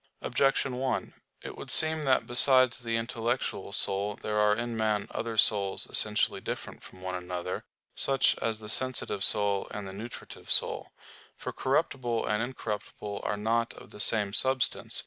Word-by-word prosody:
Objection 135 -2 0
1: 130 0 -2 0.3
It - - -7
would - - -9
seem 155 0 +4
that 135 -3 +2
besides 130 -1 +6
the 115 -2 -2
intellectual 115 +1 -3
soul 100 +1 0
there 105 0 -3
are 105 0 +3
in 120 +1 -4
man 110 -2 0
other 115 -1 -4
souls 100 -2 +3
essentially - - +1
different - - -6
from 95 - -14
one 95 0 -4
another, 90 0 -5 0.3
such 135 -1 +2
as 110 -1 -2
the 105 -1 -11
sensitive 120 -4 +2
soul 100 -1 +1
and 105 -2 -7
the 95 - -8
nutritive 110 +4 -9
soul. - - +2 0.5
For - - -6
corruptible 120 -3 -1
and 105 +1 0
incorruptible 105 -4 -5
are 105 - -2
not 115 +3 -1
of - - -14
the - - -12
same 105 -2 +3
substance. 130 +2 +2
110 Hz, 160 wpm, -28 LUFS, 105-120 Hz, 0.5 s, besides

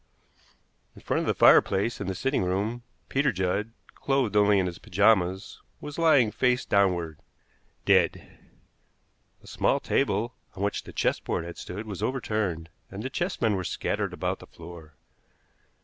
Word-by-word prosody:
In - - -14
front - - 0
of - - -3
the - - +1
fireplace 100 +4 +4
in 100 - -4
the 95 - -2
sitting 135 +9 0
room 100 +6 -1 0.3
Peter 135 0 +1
Judd, 95 +3 -1 0.2
clothed 135 -7 0
only 105 0 +5
in 95 - +2
his 85 -1 -5
pajamas, 95 0 +1 0.2
was 150 +2 -7
lying 145 -9 +4
face 125 +3 +1
downward 90 -6 +1 0.7
dead! - - +1 1.0
A - - -16
small - - +1
table 115 +5 0 0.2
on 95 - -4
which 100 - -2
the - - -9
chessboard 80 - -1
had 85 - -8
stood 105 +5 -7
was 100 -5 -7
overturned, 105 -10 -2 0.2
and 100 +2 -7
the 130 - -4
chessmen 135 - 0
were 95 - -2
scattered 85 - -2
about - - -3
the - - -13
floor. 80 -3 -12
100 Hz, 150 wpm, -27 LUFS, 90-120 Hz, 1.0 s, only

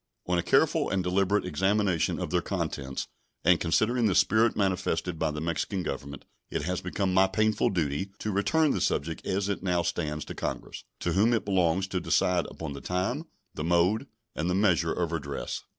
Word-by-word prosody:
On 90 0 +1
a - - +2
careful - - +2
and 95 -1 0
deliberate 95 +3 +1
examination 95 +1 +1
of - - -4
their - - +2
contents, 65 -1 -3 0.4
and 85 +1 +5
considering 110 +7 +2
the 95 - +1
spirit 110 +1 +4
manifested 90 -3 0
by 80 - +1
the 75 0 -4
Mexican 85 +4 -2
Government, 70 -3 -6 0.2
it - - -2
has 90 +3 -2
become 95 +1 -1
my 95 +1 +5
painful 110 +3 +2
duty 85 +1 -1
to 110 - -3
return 150 +10 +2
the - - -1
subject 80 +3 -1
as 95 +1 0
it 100 - -2
now 90 -2 +1
stands 80 -3 -2
to - - -7
Congress, - - -5 0.2
to - - 0
whom 110 +5 +4
it 115 - 0
belongs 95 -2 +2
to 90 - -1
decide 90 -1 +1
upon 80 -3 -6
the 70 - -8
time, 120 - -2 0.3
the 75 - -4
mode, 90 - +2 0.3
and 80 +3 -1
the 90 - +1
measure 90 -5 +3
of 85 -2 -1
redress. 70 -4 -4
90 Hz, 190 wpm, -28 LUFS, 85-100 Hz, 0.4 s, and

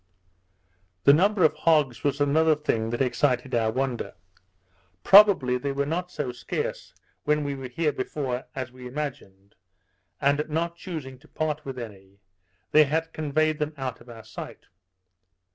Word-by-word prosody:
The 140 - +7
number 195 +4 +3
of 155 - +5
hogs 150 -8 +2
was 145 0 0
another 155 +2 +3
thing 115 -7 -1
that 120 +3 0
excited 130 0 0
our 115 -2 +2
wonder. 130 0 -3 0.9
Probably 190 -12 +7
they 140 +2 -2
were 140 +1 -1
not 175 +4 -2
so 145 -7 -4
scarce 120 -1 -5 0.3
when 150 0 +1
we 140 -1 -2
were 135 -1 -6
here 150 +5 0
before, 130 -2 -4
as 130 -2 -4
we 125 0 -10
imagined, 125 -9 -7 0.7
and 140 +2 +2
not 165 +2 -1
chusing 155 -8 -7
to 155 - -20
part 155 -1 -3
with 135 -1 -6
any, 100 -5 -10 0.5
they 155 0 +7
had 160 +3 -2
conveyed 155 +1 0
them 150 0 -2
out 130 -3 -5
of 125 - -16
our 115 -2 -10
sight. 110 - -9
140 Hz, 155 wpm, -26 LUFS, 125-155 Hz, 0.9 s, The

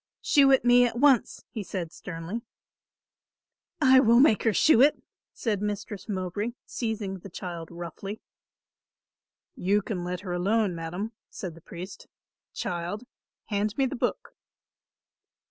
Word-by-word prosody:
"Shew 280 -3 +5
it 265 -2 +4
me 245 0 +7
at 235 - -5
once," 265 -2 +3
he 220 - -4
said 180 -4 -4
sternly. 180 +5 -6 1.4
"I 260 -3 +7
will 235 -1 +6
make 255 -6 +5
her 225 - +3
shew 245 +4 +5
it," 290 +2 +5 0.3
said 210 -4 -2
Mistress 210 0 -4
Mowbray, 200 +4 -2
seizing 215 -5 -3
the 200 - -10
child 170 -2 -6
roughly. 175 +5 -7 1.3
"You 200 +3 +1
can 185 -5 -3
let 180 0 -4
her 185 -3 -4
alone, 200 +2 +1
madam," 175 +6 -4 0.2
said 185 -6 -6
the 165 - -15
priest. 180 +4 -9 0.4
"Child, 175 +5 -4 0.5
hand 210 0 -1
me 270 - +3
the 265 - -3
book." 240 - -2
205 Hz, 135 wpm, -27 LUFS, 180-235 Hz, 1.4 s, me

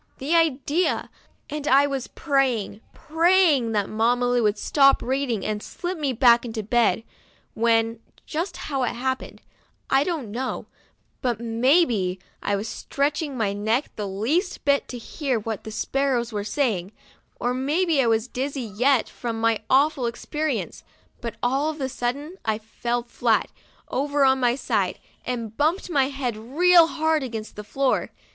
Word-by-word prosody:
The 285 +5 -2
idea! 325 +1 +1 0.4
and 295 0 -5
I 280 0 +6
was 275 -3 -3
praying, 255 -8 0
praying 325 -6 +3
that 205 -2 +1
Mamma 235 +3 +1
Lu 245 0 +2
would 210 -1 +2
stop 275 +4 +4
reading 255 -5 -1
and 210 -1 -2
slip 355 +10 -5
me 295 -5 -1
back 240 -1 +5
into 225 -3 -4
bed, 230 +1 +2 0.5
when, 225 0 +2 0.3
just 335 +5 -3
how 275 -3 -3
it 250 - 0
happened, 260 +2 -4 0.5
I 270 +1 +5
don't 295 - -3
know, 255 +4 -3 0.6
but 240 -3 -1
maybe 230 - +2 0.2
I 205 - 0
was 200 +3 -3
stretching 285 +3 -2
my 205 -4 0
neck 220 +7 0
the 210 -2 -4
least 270 - -1
little 280 -1 +4
bit - - -30
to 250 - -6
hear 260 +1 -2
what 220 -1 -5
the 220 - -6
sparrows 245 0 -1
were 205 -1 -2
saying, 215 - -1 0.5
or 245 +1 0
maybe 295 +4 +1
I 245 - +2
was 225 +1 +2
dizzy 270 +2 -3
yet 235 +4 +2
from 230 -2 -5
my 230 -1 +2
awful 275 -2 +3
experience, 300 +6 -3 0.4
but 235 -1 -5
all 270 +5 +1
of 310 0 -6
a 265 - -1
sudden 275 +7 -4
I 220 -1 0
fell 235 +2 -3
flat, 240 - 0 0.4
over 285 +1 +1
on 265 0 +4
my 245 -1 +2
side, 210 -8 -1 0.3
and 230 -3 -4
bumped 325 - 0
my 275 -4 +3
head 270 -4 -3
real 330 +9 +5
hard 315 -1 +1
against 225 -4 -6
the 210 - -7
floor. 270 +5 0
255 Hz, 160 wpm, -24 LUFS, 225-285 Hz, 0.6 s, I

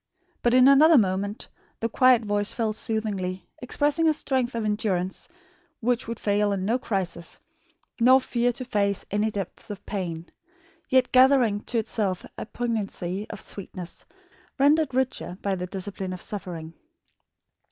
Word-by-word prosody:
But 240 +1 +3
in 255 0 +7
another 300 +3 +7
moment 200 0 0 0.3
the 230 - 0
quiet 245 0 +4
voice 205 0 +1
fell 225 -2 -1
soothingly, 205 -5 -2 0.2
expressing 295 +5 +1
a 315 - +4
strength 260 -5 -1
of 230 -2 -2
endurance 195 - -1 0.5
which 245 +1 0
would 230 0 -5
fail 205 0 +1
in 190 -1 -2
no 235 +5 +1
crisis, 175 -7 -3 0.6
nor 255 +3 +7
fear 245 -1 0
to 255 +2 -6
face 200 -4 0
any 210 +2 +1
depths 200 -2 -6
of 205 -2 -8
pain; 170 -5 -4 0.6
yet 260 -1 +3
gathering 255 -5 +5
to 240 - -1
itself 205 -4 -1
a - - -6
poignancy 210 -4 -3
of 210 - -7
sweetness, 185 -3 -8 0.5
rendered 290 -1 +3
richer 260 -8 -1
by 200 - 0
the 180 -1 -3
discipline 190 0 -5
of 180 - -7
suffering. 170 -6 -5
215 Hz, 145 wpm, -25 LUFS, 195-250 Hz, 0.6 s, in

